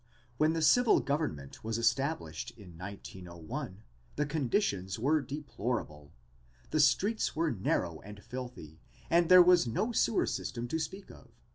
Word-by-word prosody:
When 160 +2 +2
civil 235 +10 +5
government 140 - -3
was 110 0 -2
established 120 - -1
in 90 -6 -13
1901 90 0 -8 0.3
the 150 - 0
conditions 120 - -1
were 145 +7 +2
deplorable. 120 - -4 0.6
The 155 - +1
streets 195 - +2
were 165 0 +1
narrow 90 -6 -1
and 105 0 -11
filthy 125 -12 -8 0.3
and 170 0 +4
there 185 -1 +10
was 175 -6 +5
no 210 - -1
sewer 225 -1 +2
system 120 0 -4
to 160 - -1
speak 190 +5 -6
of. - - -15
125 Hz, 135 wpm, -31 LUFS, 95-160 Hz, 0.6 s, there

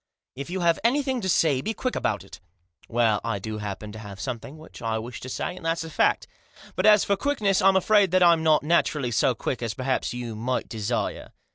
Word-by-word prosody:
" - - -67
If 140 - -7
you 185 +1 -3
have 170 -1 +2
anything 260 +1 +1
to 190 - -2
say, 150 -6 +3
be 220 +9 -3
quick 255 - -2
about 105 -4 -1
it." 100 - -13 0.5
"Well, 115 -3 +2
I 115 -3 -1
do 110 +2 -5
happen 105 +1 -6
to 110 - -9
have 100 -3 -9
something 130 +7 -6
which 155 - -13
I 115 -1 -1
wish 115 +2 -7
to 130 - -7
say, 180 - -3
and 185 - -12
that's 165 0 -1
a 160 - -8
fact; - - +2 0.5
but - - +2
as 210 -1 +7
for 200 - +1
quickness 205 -5 +1
I'm 195 0 +5
afraid 200 +1 +4
that 185 +1 +3
I'm 170 -2 +5
not 155 -2 +3
naturally 150 -5 +1
so 120 +2 +2
quick 125 - -3
as 115 -2 -3
perhaps 130 0 -1
you 120 -2 -5
might 125 +4 -2
desire." 110 +1 -3
135 Hz, 230 wpm, -25 LUFS, 115-185 Hz, 0.5 s, as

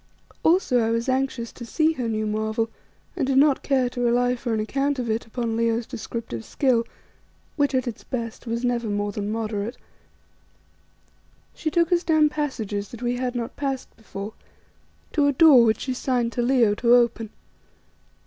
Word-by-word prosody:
Also 320 -7 +3
I 225 -1 +1
was 230 +2 -1
anxious 260 -3 -1
to 240 - -10
see 310 +7 +1
her 250 -6 -3
new 215 -1 -1
marvel, 220 +1 -1 0.4
and 295 -7 -1
did 270 -1 +2
not 280 0 +4
care 265 -3 +1
to 245 - -4
rely 245 +1 +2
for 240 -1 -4
an 220 - 0
account 275 +6 -1
of 240 -3 -2
it 220 +1 -2
upon 230 0 -2
Leo's 230 0 +1
descriptive 220 - -6
skill, 245 - +1 0.7
which 285 -2 +1
at 255 -1 0
its 230 - -5
best 235 -1 -5
was 235 +2 -2
never 240 -2 0
more 205 0 -1
than 205 0 -3
moderate. 220 0 -3 1.8
She 315 - -3
took 335 +1 +1
us 350 0 +3
down 310 -2 +4
passages 220 -10 -3
that 235 0 -9
we 245 0 0
had 250 0 -2
not 235 +1 -4
passed 270 -2 -4
before, 210 -1 -8 0.8
to 295 -2 +2
a - - +4
door 275 -4 +7
which 220 -2 +1
she 260 - -2
signed 250 -2 0
to 240 - -2
Leo 240 -4 +3
to 235 +3 +4
open. 235 -2 +2
240 Hz, 175 wpm, -24 LUFS, 225-265 Hz, 1.8 s, door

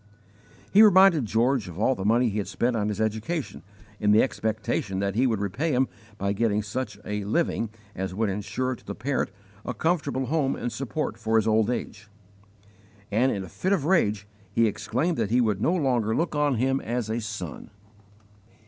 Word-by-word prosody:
He 205 - +8
reminded 190 - +6
George 120 +2 +1
of 85 - -9
all 115 +6 +2
the 95 - -5
money 115 +4 +3
he 105 0 -2
had 100 - -3
spent 120 0 0
on 105 -2 0
his 105 0 -3
education 110 +9 -2 0.4
in 105 - +1
the 105 +1 +6
expectation 110 -5 -2
that 100 0 -1
he 125 +6 +2
would 110 -4 0
repay 130 - -1
him 130 +1 +2 0.3
by 100 0 -1
getting 105 0 +1
such 125 +6 -4
a 105 0 -3
'living' 115 0 0 0.3
as 95 0 -3
would 110 +2 +1
insure 105 +6 -2
to - - -19
the 100 - -6
parent 130 +3 -1 0.3
a 125 - -4
comfortable 145 -2 0
home 140 0 0
and 120 - -3
support 135 -3 -3
for 110 0 0
his 110 -1 +3
old 110 0 +3
age; 105 -3 -4 1.0
and 125 +6 +3
in 100 - -3
a - - -8
fit 190 - -1
of 160 -8 0
rage 105 - +2 0.3
he 115 +3 +3
exclaimed 130 - -1
that 110 -3 0
he 120 +3 +3
would 105 -5 +1
no 170 - +2
longer 125 - +1
look 165 0 0
on 145 -2 +2
him 135 +3 +1
as 120 -1 -2
a 115 +2 -2
son. 105 -8 -6
115 Hz, 195 wpm, -26 LUFS, 105-135 Hz, 1.0 s, He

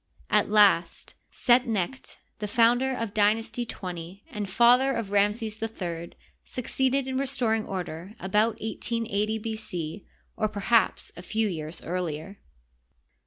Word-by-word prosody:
At - - +3
last 205 -5 +4 0.2
Set 245 +1 +3
necht, 225 +4 -3 0.2
the 210 - -3
founder 240 +4 +3
of 230 -5 -3
Dynasty 220 +3 +1
XX 180 -1 -7
and 210 -5 -4
father 245 +6 +5
of 230 -5 -3
Ramses 210 +2 +1
III, 175 -7 -4 0.3
suc 250 - -6
ceeded 265 0 +1
in 260 0 -2
restoring 240 -5 0
order 180 0 -5
about 215 +4 +1
11 230 +1 -2
80 210 +2 0
B. 220 0 -4
C. 180 -4 -5 0.3
or 215 - +1
perhaps 220 +2 +1
a 175 - -8
few 220 +4 0
years 160 -2 -5
earlier. 175 +1 -4
215 Hz, 135 wpm, -27 LUFS, 190-230 Hz, 0.3 s, father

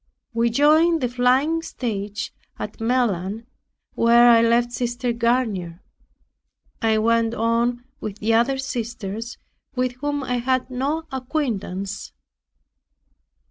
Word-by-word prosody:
We 230 +1 +2
joined 310 +6 +4
the 250 - +1
flying 255 +7 +2
stage 210 -7 -4 0.2
at - - -6
Melun 225 -3 0 0.5
where 235 +1 +6
I 230 -1 +6
left 235 +1 +3
Sister 240 0 -2
Garnier. 225 -7 -1 1.0
I 220 -1 +3
went 230 +1 +2
on 235 +2 +1 0.2
with 210 -1 -5
the 220 +2 0
other 240 +4 +3
sisters 230 -3 -5 0.4
with 255 0 0
whom 290 -1 -1
I 250 -1 -1
had 255 +1 0
no 280 +6 -1
acquaintance. 235 - -3
235 Hz, 110 wpm, -23 LUFS, 225-255 Hz, 1.0 s, where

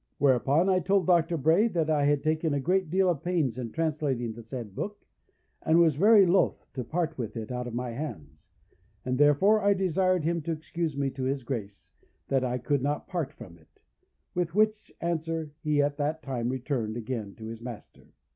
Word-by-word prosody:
"Whereupon 140 +5 +3
I 185 -1 +3
told 195 +1 +2
Dr. 170 -1 +3
Bray 160 - +4
that 170 -8 -1
I 150 -2 +2
had 145 -1 +2
taken 155 -1 0
a - - 0
great 180 +4 +1
deal 190 +3 +2
of 170 -6 0
pains 155 -9 0
in 120 -2 -4
translating 140 -6 -1
the 115 - -10
said 115 -3 -7
book, 205 - -6 0.6
and 160 +1 +3
was 165 -2 +5
very 200 +6 +6
loth 185 +2 +2
to 130 - -3
part 160 +4 -2
with 115 -1 -4
it 110 +1 -5
out 125 0 -3
of 120 - -6
my 125 0 -3
hands, 80 - -7 0.6
and 130 +1 -1
therefore 170 +9 +5
I 200 0 +3
desired 185 -1 +1
him 170 +1 0
to 165 +2 -2
excuse 160 -1 -4
me 140 -1 0
to 130 0 -4
his 135 0 -1
Grace, 110 -6 -6 0.4
that 135 -1 +2
I 125 0 -1
could 140 +2 0
not 145 +2 -2
part 170 -7 -3
from 95 - -13
it; 80 - -28 0.5
with 175 -1 -2
which 215 0 +1
answer 165 -2 -2
he 150 -2 +2
at 145 0 -1
that 155 +2 -2
time 125 -4 -2
returned 125 -4 -2
again 110 -4 -5
to 110 - -10
his 115 +1 -7
master. 120 -2 -10
145 Hz, 200 wpm, -28 LUFS, 125-170 Hz, 0.6 s, very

